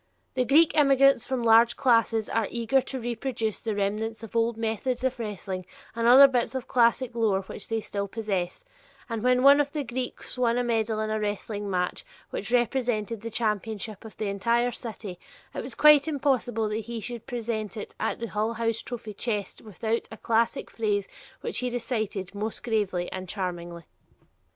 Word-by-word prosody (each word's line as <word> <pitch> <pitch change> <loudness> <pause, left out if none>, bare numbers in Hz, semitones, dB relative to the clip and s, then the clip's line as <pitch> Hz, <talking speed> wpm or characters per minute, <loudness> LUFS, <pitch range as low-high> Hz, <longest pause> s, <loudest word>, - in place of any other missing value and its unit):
The 255 -1 +1
Greek 310 +5 +5
immigrants 275 -3 +5
form 260 -3 -1
large 230 +1 +5
classes 230 -3 +3
and - - -5
are 215 - -1
eager 240 +3 +1
to 265 0 -6
reproduce 230 -2 -3
the 220 -2 -3
remnants 215 +2 -2
of 225 - -10
old 230 0 +1
methods 230 +3 -2
of 260 -1 -1
wrestling, 195 -4 -4 0.3
and 230 0 +1
other 265 +3 +10
bits 250 -1 0
of 260 - -4
classic 240 0 +2
lore 215 -5 +1
which 195 +1 -8
they 225 -1 -1
still 200 -1 -3
possess, 200 - -3 0.4
and 230 -2 -3
when 250 +1 +3
one 280 +1 +8
of 285 -1 -3
the 295 -1 -2
Greeks 250 +1 -5
won 240 -1 +2
a 245 - +1
medal 225 -2 0
in 215 0 -2
a 215 - 0
wrestling 205 0 -3
match 180 -1 -1 0.3
which - - -4
represented 235 -3 0
the 230 - -5
championship 215 -2 -2
of 220 - -11
the 215 - -2
entire 235 +5 +1
city, 215 -6 -7 0.3
it - - -3
was - - -7
quite 300 -1 +7
impossible 260 -7 0
that 215 0 -3
he 235 0 -5
should 240 +1 -7
present 225 -4 -3
it 210 - -6
to - - 0
the 230 - -3
Hull 215 +1 -1
House 230 0 -1
trophy 230 -3 -7
chest 205 -2 -3
without 220 +2 -3
a 220 - -8
classic 230 +5 0
phrase 205 -3 -1 0.3
which 470 - -2
he 250 - -1
recited 220 -6 -3
most 210 +3 -4
gravely 205 -7 0
and 185 -1 -6
charmingly. 175 -3 -4
225 Hz, 185 wpm, -27 LUFS, 210-245 Hz, 0.4 s, other